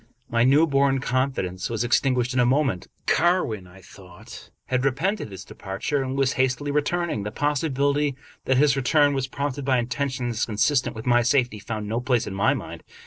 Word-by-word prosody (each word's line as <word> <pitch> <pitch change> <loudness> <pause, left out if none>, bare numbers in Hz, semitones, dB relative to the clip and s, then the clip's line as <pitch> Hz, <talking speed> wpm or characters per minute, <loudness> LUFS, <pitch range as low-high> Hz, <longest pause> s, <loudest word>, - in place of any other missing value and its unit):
My 115 0 +3
new 140 +6 +5
born 140 -2 +2
confidence 130 -9 -2
was 115 0 -1
extinguished 125 0 +1
in 130 - +1
a - - +5
moment. 130 -9 +1 0.2
Carwin, 160 - +1
I 95 +2 -16
thought, 95 +4 -13 0.2
had 130 0 -1
repented 160 - -1
his 95 -2 -9
departure, 95 +9 -3
and 130 0 -3
was 135 -1 +2
hastily 130 +2 0
returning. 150 -3 -1
The 105 - -4
possibility 145 +1 0 0.3
that 130 - +2
his 140 -1 +4
return 145 +2 +3
was 135 -1 -1
prompted 140 0 -4
by 130 -1 +2
intentions 125 -2 -2
consistent 120 +6 +1
with 110 - -8
my 120 -1 +4
safety 125 -3 +1
found 105 0 -5
no 115 +3 -2
place 125 -2 +1
in 100 - -6
my 100 +1 +2
mind. - - -7
130 Hz, 180 wpm, -24 LUFS, 115-140 Hz, 0.3 s, new